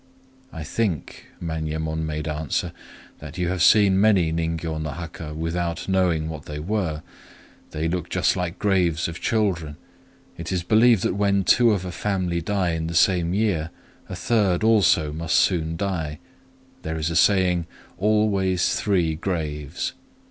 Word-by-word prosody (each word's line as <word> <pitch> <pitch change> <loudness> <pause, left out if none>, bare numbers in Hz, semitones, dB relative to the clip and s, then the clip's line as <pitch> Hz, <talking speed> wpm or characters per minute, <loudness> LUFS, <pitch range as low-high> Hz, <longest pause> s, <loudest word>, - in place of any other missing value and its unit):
"I 80 -3 -7
think," 90 - -3
Manyemon 80 -1 -3
made 75 0 -4
answer, 75 0 -2 0.5
"that 75 +2 -9
You 90 -1 0
have 90 -1 -2
seen 100 0 +5
many 95 -7 +3
ningyô 80 -1 -2
no 80 - -3
haka 80 0 -7
without 85 +1 -3
knowing 90 -5 +1
what 80 -3 -7
they 75 - -6
were;—they 80 -3 -5
look 85 0 -3
just - - +1
like 90 -2 -3
graves 90 -5 +1
of 85 0 -7
children. 90 -9 -1 0.6
It 85 +1 -5
is 90 -2 -1
believed 110 +2 +4
that - - +1
when 100 0 +1
two 120 +6 +5
of 100 -4 0
a 90 - -4
family 90 -3 -1
die 95 0 0
in 80 0 -2
the 85 - -5
same 85 0 +3
year, 95 -7 0 0.4
a 95 - -5
third 95 -1 +1
also 95 -9 +3
must 80 +1 -1
soon 80 -3 +2
die. 80 -6 -3 0.6
There 80 +1 -4
is 80 +1 -1
a - - -3
saying, 90 -3 +3 0.3
Always 100 -3 +2
three 90 -6 +1
graves. 80 -3 -3
85 Hz, 150 wpm, -23 LUFS, 80-95 Hz, 0.6 s, seen